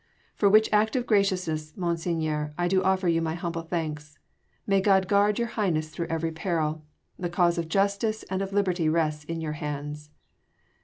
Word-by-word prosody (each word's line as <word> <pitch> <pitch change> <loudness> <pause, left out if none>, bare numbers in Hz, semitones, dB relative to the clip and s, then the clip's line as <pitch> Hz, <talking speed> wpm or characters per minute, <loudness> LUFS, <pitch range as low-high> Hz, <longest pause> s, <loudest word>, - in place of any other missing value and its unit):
"For 200 - +3
which 215 +2 +6
act 215 +2 +3
of 250 -2 0
graciousness, 180 -8 0
Monseigneur, 165 -4 -1
I 175 0 +1
do 190 +1 +2
offer 190 -1 +1
you 165 -1 +2
my 160 0 -1
humble 170 -1 -3
thanks. 155 -3 -4 0.5
May 195 -1 +3
God 190 -1 +3
guard 205 +1 +3
your 235 -1 -1
Highness 170 -9 -1
through 170 +2 -4
every 165 0 -2
peril! 160 -2 -2 0.4
The 175 - -2
cause 175 -1 +2
of 165 -1 -4
justice 200 +3 0
and 190 0 -3
of 195 0 -3
liberty 185 -5 +1
rests 155 -2 0
in 165 +1 -4
your 155 -1 -3
hands." 150 -1 -5
170 Hz, 175 wpm, -27 LUFS, 155-195 Hz, 0.5 s, which